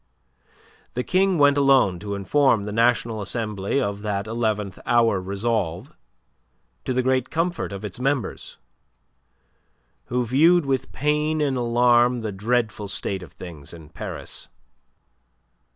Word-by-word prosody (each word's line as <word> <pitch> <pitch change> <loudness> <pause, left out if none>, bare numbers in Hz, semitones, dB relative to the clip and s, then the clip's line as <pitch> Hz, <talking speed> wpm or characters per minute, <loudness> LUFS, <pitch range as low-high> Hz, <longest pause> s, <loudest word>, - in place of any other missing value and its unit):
The 125 - -1
King 185 +2 +2
went 145 -1 +4
alone 135 -10 +4
to 100 +1 -4
inform 110 +2 +2
the 105 - -4
National 115 0 +1
Assembly 105 +2 -2
of 100 -6 -2
that 105 -1 -2
eleventh 110 -4 -2
hour 115 -5 +2
resolve, 100 - -2 0.9
to - - -1
the 130 0 +1
great 130 0 +1
comfort 165 - -2
of 100 +1 -6
its 100 +2 -7
members, 135 -1 -2 1.5
who 125 0 -1
viewed 160 +7 +4
with 135 -2 -1
pain 150 +2 0
and 140 -3 +1
alarm 120 0 +3
the 110 -1 -3
dreadful 110 +1 -1
state 95 -1 -2
of 90 - -12
things 85 -4 -10
in 80 -3 -13
Paris. - - -6
120 Hz, 130 wpm, -23 LUFS, 100-135 Hz, 1.5 s, went